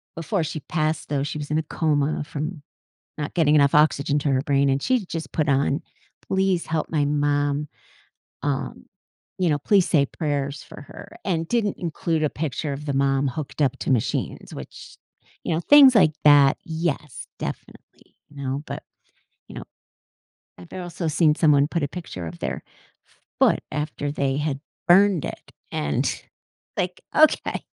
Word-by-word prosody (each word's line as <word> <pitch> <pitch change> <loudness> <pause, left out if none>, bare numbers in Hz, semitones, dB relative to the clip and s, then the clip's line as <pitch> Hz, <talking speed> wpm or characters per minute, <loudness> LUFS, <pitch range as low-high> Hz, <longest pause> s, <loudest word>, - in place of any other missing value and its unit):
before 165 +2 -1
she 155 0 -4
passed 155 +1 -2
though, 140 -2 0
she 150 +1 -4
was 145 - -6
in 150 - +1
a 160 - 0
coma 150 -1 0
from 150 +2 -5 0.6
not 150 -1 -4
getting 155 -4 +3
enough 140 -2 +4
oxygen 150 -1 +3
to 145 0 0
her 130 -1 +2
brain, 140 -1 +2
and 135 0 +1
she 250 -6 +1
just 165 -2 -6
put 155 -1 0
on, 140 +1 +2 0.5
"Please 190 -2 +1
help 160 -1 -2
my 150 -3 +1
mom, 145 0 0 0.8
um, 140 -1 -3 0.5
you 180 -2 +2
know, 150 -2 +2
please 190 +5 +3
say 140 -3 +3
prayers 145 -2 -3
for - - -12
her," - - -12
and 165 -4 -1
didn't 220 -3 0
include 165 -2 -2
a 150 - +1
picture 150 -1 -3
of 145 +2 -6
the 140 - -1
mom 135 0 +2
hooked 140 +3 -5
up 135 -4 +2
to - - -2
machines, 125 -5 -1
which - - -10 0.5
you 165 - 0
know, 160 - 0
things 275 +4 +8
like 175 -8 +5
that, 145 -2 +6
yes, 160 -5 -3
definitely, - - -9
you 145 - -19
know? 140 0 -3
But, - - -6 0.6
you - - -12
know, - - -7 0.9
I've 90 -1 -14
also 175 -2 -4
seen 155 0 +3
someone 150 -3 +4
put 170 -2 -1
a - - +1
picture 140 - -7
of 85 +1 -9
their 65 -1 -4 0.4
f - - -31 0.2
foot - - +4
after 150 0 -3
they 140 -2 -1
had 145 -2 -2 0.3
burned 190 -2 +5
it - - -8 0.2
and, 70 -1 0 0.6
like, 180 0 -2
okay, 310 0 +3
150 Hz, 170 wpm, -23 LUFS, 140-165 Hz, 0.9 s, things